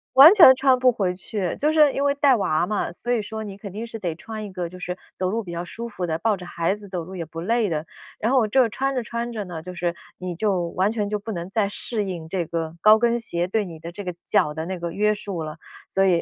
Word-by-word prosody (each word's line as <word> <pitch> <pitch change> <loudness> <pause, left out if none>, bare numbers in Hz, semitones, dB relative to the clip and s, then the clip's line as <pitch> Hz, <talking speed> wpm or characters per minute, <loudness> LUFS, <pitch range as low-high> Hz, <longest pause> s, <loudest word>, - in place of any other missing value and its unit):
完 280 +4 +12
全 335 -10 +10
穿 265 -2 +4
不 255 0 +4
回 190 -6 -1
去。 190 -1 -3
就 300 +2 +2
是 305 -3 +5
因 280 - -1
为 280 - +3
带 280 -2 +4
娃 175 -5 +1
嘛， 210 -1 -1
所 240 +8 -3
以 230 - +1
说 220 +1 -6
你 195 -1 -8
肯 200 -2 -8
定 225 +4 -5
是 225 - -7
得 175 -4 -2
穿 215 +4 -7
一 200 - -8
个 180 -2 -3
就 185 - -11
是 180 0 -4 0.2
走 185 0 0
路 225 +3 -1
比 175 - -8
较 170 - -3
舒 230 +6 -7
服 185 -6 -4
的， 160 -1 -1
抱 220 +2 +2
着 180 - -9
孩 170 +2 -1
子 205 -2 -11
走 175 -3 -4
路 190 +1 -9
也 170 - -3
不 165 +1 -8
累 225 +3 +1
的。 155 -1 -2 0.3
然 225 - 0
后 255 -5 +4
这 250 +2 +4
穿 270 +5 -1
着 250 - 0
穿 235 +2 -4
着 210 -3 -4
呢， 170 -3 -6
就 180 +2 -8
是 175 -1 -2 0.2
你 180 -1 -4
就 190 -1 0
完 190 +3 +1
全 210 -3 -2
就 210 - 0
不 220 +2 -6
能 175 -1 -5
再 205 -1 +1
适 215 +1 -3
应 170 -4 -5
这 175 -1 -2
个 165 0 -4
高 215 +1 +7
跟 235 0 +2
鞋 175 -6 -2
对 215 +3 0
你 165 -3 -9
的 165 - -7
这 205 - -7
个 180 -2 -4
脚 150 - +2
的 160 +1 -4
那 185 0 -4
个 170 0 -4
约 210 +1 +2
束 200 -5 -5
了。 155 +1 -6 0.3
所 195 - +2
以， 175 -3 +3
195 Hz, 305 characters per minute, -23 LUFS, 175-225 Hz, 0.3 s, 完